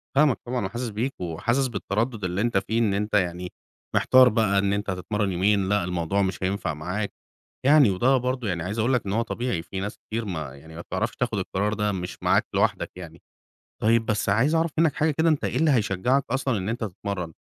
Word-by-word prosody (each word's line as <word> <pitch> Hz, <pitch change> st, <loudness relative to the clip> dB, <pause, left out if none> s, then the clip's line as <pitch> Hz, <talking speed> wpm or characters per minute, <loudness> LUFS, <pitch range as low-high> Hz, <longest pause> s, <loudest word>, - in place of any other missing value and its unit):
فاهمك 140 Hz, -3 st, +4 dB
طبعًا 125 Hz, -3 st, -1 dB
وحاسس 120 Hz, +5 st, -4 dB
بيك، 115 Hz, +6 st, -2 dB
وحاسس 110 Hz, +11 st, 0 dB
بالتردُّد 110 Hz, +1 st, -2 dB
اللي 90 Hz, +2 st, -1 dB
أنت 115 Hz, -2 st, +1 dB
فيه، 110 Hz, +4 st, 0 dB
إن 110 Hz, -4 st, +2 dB
أنت 105 Hz, +2 st, -2 dB
يعني 90 Hz, -2 st, 0 dB, 0.4 s
محتار 130 Hz, -1 st, +6 dB
بقى 105 Hz, -3 st, +2 dB
إن 100 Hz, 0 st, +1 dB
أنت 100 Hz, 0 st, -2 dB
هتتمرّن 95 Hz, +2 st, -1 dB
يومين، 95 Hz, +2 st, +2 dB
لأ 100 Hz, -1 st, +2 dB
الموضوع 90 Hz, +2 st, -1 dB
مش 95 Hz, -1 st, -2 dB
هينفع 95 Hz, -4 st, -1 dB
معاك. 90 Hz, +7 st, -4 dB, 0.5 s
يعني 145 Hz, -4 st, +6 dB
وده 125 Hz, +8 st, +3 dB
برضه 125 Hz, -1 st, -2 dB
يعني 85 Hz, -3 st, -2 dB
عايز 100 Hz, +5 st, -3 dB
أقول 120 Hz, +4 st, +2 dB
لك 120 Hz, -, +1 dB
إن 95 Hz, -, -2 dB
هو 115 Hz, -, +2 dB
طبيعي، 120 Hz, -6 st, -2 dB
في 95 Hz, +3 st, -6 dB
ناس 105 Hz, +3 st, -4 dB
كتير 115 Hz, +1 st, -5 dB
ما 80 Hz, -8 st, -5 dB
يعني 80 Hz, +3 st, -13 dB
ما 85 Hz, -, -6 dB
بتعرفش 105 Hz, +7 st, -3 dB
تاخُد 120 Hz, -4 st, -1 dB
القرار 100 Hz, +2 st, -1 dB
ده، 105 Hz, 0 st, 0 dB
مش 90 Hz, -2 st, -5 dB
معاك -, -, +3 dB
لوحدك -, -, +1 dB
يعني. 85 Hz, -2 st, -10 dB, 0.6 s
طيب 115 Hz, +1 st, +3 dB
بس 105 Hz, -1 st, 0 dB
عايز 125 Hz, +11 st, +3 dB
أعرف 165 Hz, 0 st, +1 dB
منّك 160 Hz, -2 st, +3 dB
حاجة 155 Hz, 0 st, +2 dB
كده، 160 Hz, +3 st, +2 dB
أنت 155 Hz, -3 st, +1 dB
إيه -, -, -2 dB
اللي 160 Hz, -1 st, +3 dB
هيشجّعك 120 Hz, +3 st, +2 dB
أصلًا 135 Hz, -3 st, 0 dB
إن 95 Hz, +1 st, -3 dB
أنت 115 Hz, +1 st, -3 dB
تتمرّن؟ 95 Hz, -4 st, -4 dB
105 Hz, 215 wpm, -25 LUFS, 95-120 Hz, 0.6 s, محتار